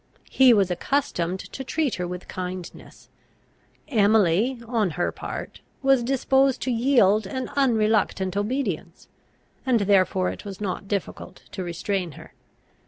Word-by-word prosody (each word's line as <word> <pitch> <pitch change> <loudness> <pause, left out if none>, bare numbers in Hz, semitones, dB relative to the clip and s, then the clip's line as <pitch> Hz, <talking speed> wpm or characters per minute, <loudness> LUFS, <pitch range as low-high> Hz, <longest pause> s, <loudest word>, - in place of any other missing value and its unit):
He 265 -2 +6
was 200 -5 +3
accustomed 180 -4 -1
to 265 - -8
treat 290 -2 -1
her 175 - -2
with 180 0 -7
kindness. 185 -1 -7 0.8
Emily, 215 - +3
on 225 -4 0
her 175 - 0
part, - - -7 0.2
was 270 -2 +4
disposed 265 +1 +2
to 260 - -1
yield 225 -5 +3
an 260 +5 -4
unreluctant 215 -7 +1
obedience, 205 - -3 0.6
and 245 -4 +2
therefore 190 -2 +2
it - - -9
was 195 -2 -8
not 195 -1 -4
difficult 200 -2 -5
to 190 - -5
restrain 175 0 -3
her. - - -13
205 Hz, 130 wpm, -24 LUFS, 185-255 Hz, 0.8 s, He